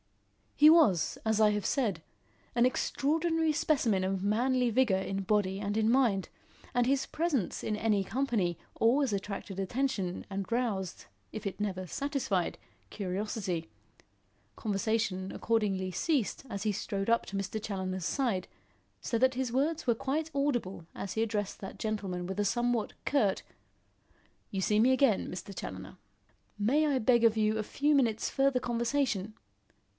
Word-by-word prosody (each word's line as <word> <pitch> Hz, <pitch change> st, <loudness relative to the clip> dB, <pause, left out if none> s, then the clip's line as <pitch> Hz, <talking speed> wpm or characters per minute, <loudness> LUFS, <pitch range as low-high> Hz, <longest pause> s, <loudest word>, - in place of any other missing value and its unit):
He 300 Hz, -, +7 dB
was, 220 Hz, -, +4 dB
as 220 Hz, -1 st, +2 dB
I 210 Hz, -1 st, +6 dB
have 210 Hz, -1 st, -2 dB
said, 210 Hz, -, 0 dB, 0.5 s
an 240 Hz, 0 st, +4 dB
extraordinary 320 Hz, +5 st, +1 dB
specimen 255 Hz, -10 st, +1 dB
of 190 Hz, 0 st, -1 dB
manly 245 Hz, +4 st, +2 dB
vigour 230 Hz, -5 st, +3 dB
in 195 Hz, +1 st, -3 dB
body 195 Hz, -1 st, +1 dB
and 205 Hz, 0 st, -2 dB
in 220 Hz, +1 st, +3 dB
mind, 235 Hz, -7 st, +2 dB, 0.4 s
and 245 Hz, -1 st, +3 dB
his 270 Hz, +1 st, +1 dB
presence 300 Hz, -, -1 dB
in 215 Hz, -, -1 dB
any 210 Hz, -2 st, +1 dB
company 210 Hz, -, 0 dB, 0.2 s
always 245 Hz, +1 st, +3 dB
attracted 195 Hz, -1 st, -4 dB
attention 195 Hz, -3 st, -2 dB
and 195 Hz, +2 st, -4 dB
roused, 215 Hz, -7 st, -2 dB, 0.3 s
if 215 Hz, -, -7 dB
it 195 Hz, -, -5 dB
never 190 Hz, -3 st, -2 dB
satisfied, 270 Hz, -, -1 dB, 0.3 s
curiosity. 190 Hz, -, -3 dB, 0.9 s
Conversation 205 Hz, -2 st, -1 dB
accordingly 200 Hz, -5 st, 0 dB
ceased 270 Hz, -, -1 dB
as 200 Hz, -3 st, -4 dB
he 215 Hz, -, +1 dB
strode 200 Hz, +1 st, -3 dB
up 230 Hz, 0 st, +2 dB
to 195 Hz, -, -6 dB
Mr. 195 Hz, +2 st, -3 dB
Challoner's 190 Hz, -4 st, -3 dB
side, 215 Hz, -5 st, 0 dB, 0.5 s
so 230 Hz, -, -1 dB
that 260 Hz, +1 st, +3 dB
his 255 Hz, -2 st, -1 dB
words 300 Hz, +6 st, 0 dB
were 240 Hz, -3 st, +3 dB
quite 285 Hz, +6 st, -2 dB
audible 240 Hz, -, -1 dB
as 195 Hz, -, -5 dB
he 220 Hz, -, 0 dB
addressed 210 Hz, -3 st, -2 dB
that 195 Hz, -, -8 dB
gentleman 195 Hz, -5 st, -3 dB
with 190 Hz, +2 st, -4 dB
a 205 Hz, -, +2 dB
somewhat 240 Hz, +1 st, 0 dB
curt: 215 Hz, -10 st, +1 dB, 1.1 s
"You 195 Hz, -, -3 dB
see 210 Hz, +2 st, +2 dB
me 245 Hz, +4 st, +5 dB
again, 260 Hz, -6 st, +3 dB
Mr. 190 Hz, +2 st, -7 dB
Challoner. -, -, -7 dB, 0.6 s
May 270 Hz, +10 st, +2 dB
I 280 Hz, -3 st, +2 dB
beg 240 Hz, 0 st, +3 dB
of 225 Hz, -1 st, +4 dB
you 215 Hz, 0 st, +2 dB
a 215 Hz, -, -1 dB
few 290 Hz, +7 st, +1 dB
minutes' 230 Hz, -6 st, +2 dB
further 270 Hz, -1 st, +2 dB
conversation? 235 Hz, -3 st, -1 dB
220 Hz, 150 wpm, -31 LUFS, 195-260 Hz, 1.1 s, He